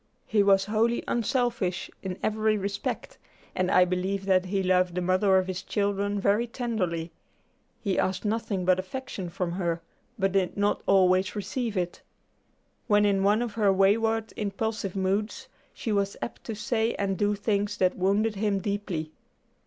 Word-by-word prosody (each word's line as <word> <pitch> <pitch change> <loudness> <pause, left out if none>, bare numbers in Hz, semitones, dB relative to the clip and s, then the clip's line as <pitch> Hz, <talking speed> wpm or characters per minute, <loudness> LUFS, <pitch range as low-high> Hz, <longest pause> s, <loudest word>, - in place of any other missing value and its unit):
He 215 -1 +2
was 195 -1 +4
wholly 225 +3 +1
unselfish 235 -6 -1
in 185 -1 -4
every 215 0 +1
respect, 200 0 -4 0.3
and 185 0 0
I 180 -1 +5
believe 185 +2 -2
that 185 -1 +3
he 195 +1 -1
loved 180 -1 +2
the 180 - 0
mother 185 +2 +3
of 185 - +2
his 185 0 -4
children 200 0 -1
very 205 +4 +2
tenderly. 185 -9 -2 0.7
He 195 -4 0
asked 190 +2 -1
nothing 205 -3 -1
but 185 0 +4
affection 190 -2 -5
from 170 0 -3
her, 170 -2 -1 0.4
but 195 -2 +1
did 190 -1 0
not 205 0 +1
always 185 0 +4
receive 225 +1 -3
it. 175 -1 -2 0.9
When 210 -2 +4
in 200 -1 +2
one 205 +4 +3
of 235 -4 -4
her 205 -3 +3
wayward 220 +3 +2
impulsive 205 -1 -3
moods, 200 +6 -1 0.2
she 225 - -4
was 200 -1 0
apt - - -6
to 225 - -4
say 225 0 0
and 195 -1 -1
do 205 +2 +1
things 205 0 -1
that 185 -1 +2
wounded 200 +4 +1
him 205 -1 +1
deeply. 195 -6 -3
200 Hz, 160 wpm, -27 LUFS, 185-215 Hz, 0.9 s, I